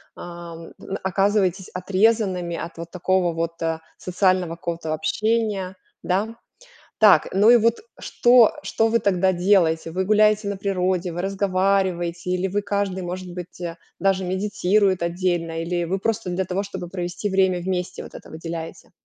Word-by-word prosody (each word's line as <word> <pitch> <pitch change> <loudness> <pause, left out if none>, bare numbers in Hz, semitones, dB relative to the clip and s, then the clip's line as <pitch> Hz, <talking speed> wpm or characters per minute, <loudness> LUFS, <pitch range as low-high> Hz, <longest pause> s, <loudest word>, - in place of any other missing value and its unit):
ам, 170 -1 -9
н 195 - -5
оказываетесь 190 0 +1
отрезанными 185 -2 +1
от 165 0 -7
вот 170 0 -8
такого 180 -1 +1
вот, 165 0 -4
а, 160 0 -1 0.2
социального 185 -1 +1
какого-то 170 -2 -4
общения, 200 +3 -1 0.3
да? 205 +5 -1 0.7
Так, 205 -8 +6
ну 205 +4 +4
и 240 - +8
вот 230 +1 +2 0.2
что 240 -2 +4
что 225 - +1
вы 230 +1 +2
тогда 190 -2 +2
делаете? 175 -3 +2
Вы 190 +2 -1
гуляете 215 0 +3
на 200 - -2
природе, 185 -2 -1
вы 175 +2 -4
разговариваете 190 -3 0
или 185 +1 0
вы, 205 +2 -1
каждый, 200 -2 -2
может 180 0 -6
быть, 180 0 -9
а, 170 -1 -5 0.2
даже 190 -1 +1
медитирует 190 0 +1
отдельно, 170 -2 -1
или 175 0 -1
вы 190 +3 -1
просто 225 -2 -2
для 185 +2 -1
того, 185 +2 -2
чтобы 185 -3 -7
провести 180 +3 -4
время 190 -2 +2
вместе, 180 0 -3
вот - - -12
это - - -11
выделяете? 165 0 -7
185 Hz, 155 wpm, -23 LUFS, 175-200 Hz, 0.7 s, и